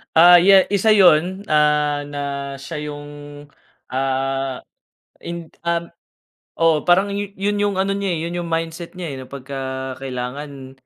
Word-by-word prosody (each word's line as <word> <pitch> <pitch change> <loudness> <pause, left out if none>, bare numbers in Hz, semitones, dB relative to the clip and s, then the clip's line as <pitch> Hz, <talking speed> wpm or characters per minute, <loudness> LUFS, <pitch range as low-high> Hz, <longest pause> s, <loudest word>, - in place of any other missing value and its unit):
Ah, 175 +2 +9
ya 190 +1 +6
isa 215 +2 +4
yun, 185 0 +4
ah, 150 -1 +3
na 145 0 -6 0.4
siya 165 - -7
yung, 145 0 -7 0.9
ah, 135 0 -2 0.6
ind 170 -1 -6 0.2
um 170 0 -1 0.7
oo 165 -2 +3
parang 190 +3 +4
yun 205 0 -2
yung 205 -2 0
ano 195 +1 +1
niya, 200 0 -2
eh, - - -3
yun 170 - -4
yung 170 - -5
mindset 165 +1 -4
nya, 180 - -6
eh, - - -6
na 130 - -9
pagka 140 0 -8 0.5
kailangan, 135 +1 -6
165 Hz, 145 wpm, -20 LUFS, 140-190 Hz, 0.9 s, Ah